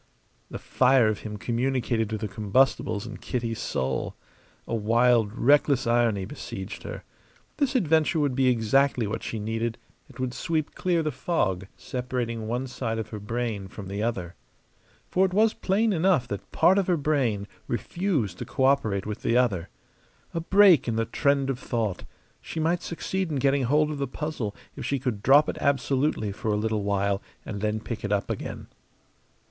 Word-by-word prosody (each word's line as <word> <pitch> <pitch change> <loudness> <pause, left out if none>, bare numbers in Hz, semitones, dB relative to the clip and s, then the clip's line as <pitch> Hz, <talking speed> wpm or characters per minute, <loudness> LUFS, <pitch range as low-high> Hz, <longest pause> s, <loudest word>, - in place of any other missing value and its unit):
The - - -5
fire 130 -3 +3
of 105 - -2
him 105 -1 -6
communicated 120 -1 0
to 110 - -2
the 110 0 -3
combustibles 105 0 +1
in - - -7
Kitty's 115 -2 -3
soul. 65 0 -2 0.5
A - - -4
wild, 115 0 +3
reckless 140 +2 +3
irony 115 -4 +2
besieged 100 -5 -7
her. - - -7 0.5
This 280 -3 0
adventure 160 - +3
would 145 -3 +1
be 130 0 +2
exactly 125 +1 +3
what 105 +2 -3
she 115 - -4
needed; 115 +2 -2 0.3
it - - -15
would 130 -1 -2
sweep 155 0 -2
clear 175 -3 0
the 155 - -1
fog 100 - -1
separating 120 -3 -3
one 120 +3 -1
side 125 -3 -3
of 110 - -4
her 105 - -6
brain 110 -2 -3
from 95 -1 -9
the 100 +1 -3
other. 95 -7 -2 0.7
For 185 - +2
it 190 -1 +1
was 220 +1 +4
plain 210 +3 +1
enough 165 -7 +2
that 100 -2 -6
part 190 +2 +4
of 195 - -1
her 180 -2 +3
brain 130 -9 0 0.2
refused 135 - -1
to - - -4
cooperate 130 -8 +1
with 105 -1 -5
the 115 +1 +2
other. 95 -9 +1 0.6
A 165 - -1
break 190 -3 +5
in 115 - 0
the 115 0 +1
trend 140 +3 +1
of 130 - -5
thought: 110 -8 -2 0.4
she 160 - -6
might 170 +2 +1
succeed 190 +2 -3
in 150 - -2
getting 135 0 +2
hold 150 +4 +2
of 145 - -5
the 140 - -1
puzzle 150 -9 -4 0.2
if - - -6
she 140 - 0
could 125 -6 -3
drop 145 +6 +6
it - - -3
absolutely 140 -5 +1
for 110 +4 -6
a 105 - +1
little 110 0 0
while 100 0 0 0.2
and 100 -2 -5
then 105 0 0
pick 115 +1 -6
it 105 - -3
up 100 -1 0
again. - - -5
120 Hz, 180 wpm, -26 LUFS, 105-145 Hz, 0.7 s, drop